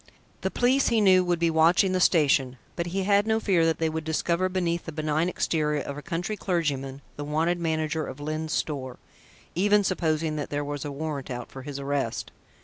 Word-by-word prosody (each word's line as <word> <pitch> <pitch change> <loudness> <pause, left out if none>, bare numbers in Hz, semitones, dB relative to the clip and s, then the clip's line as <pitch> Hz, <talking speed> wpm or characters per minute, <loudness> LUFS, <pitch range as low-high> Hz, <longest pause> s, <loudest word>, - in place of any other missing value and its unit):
The - - 0
police, 260 +3 +2
he 230 -2 +3
knew, 185 -3 +5
would 175 -1 +1
be 165 0 +2
watching 165 +4 +4
the 185 - +1
station, 140 -7 +3 0.2
but 170 0 -2
he 190 +3 -1
had 200 +2 +3
no 220 0 +2
fear 180 -7 +2
that 165 - +1
they 165 - 0
would 160 0 -3
discover 170 +3 0
beneath 175 -2 -1
the 160 - -5
benign 155 +2 0
exterior 150 -4 0
of 140 - -5
a 145 - -7
country 175 +6 -3
clergyman, 145 -8 -2
the 145 - -4
wanted 160 +4 0
manager 160 -1 -1
of 130 - -8
Lyne's 155 +1 -3
Store, 130 -5 -2 0.6
even 205 +3 +3
supposing 160 -4 0
that 145 - -4
there 145 0 -2
was 145 -1 -4
a 145 - -4
warrant 140 -2 -4
out 125 -2 -6
for 135 - -8
his 140 +1 -6
arrest. 140 -4 -2
160 Hz, 205 wpm, -26 LUFS, 145-180 Hz, 0.6 s, knew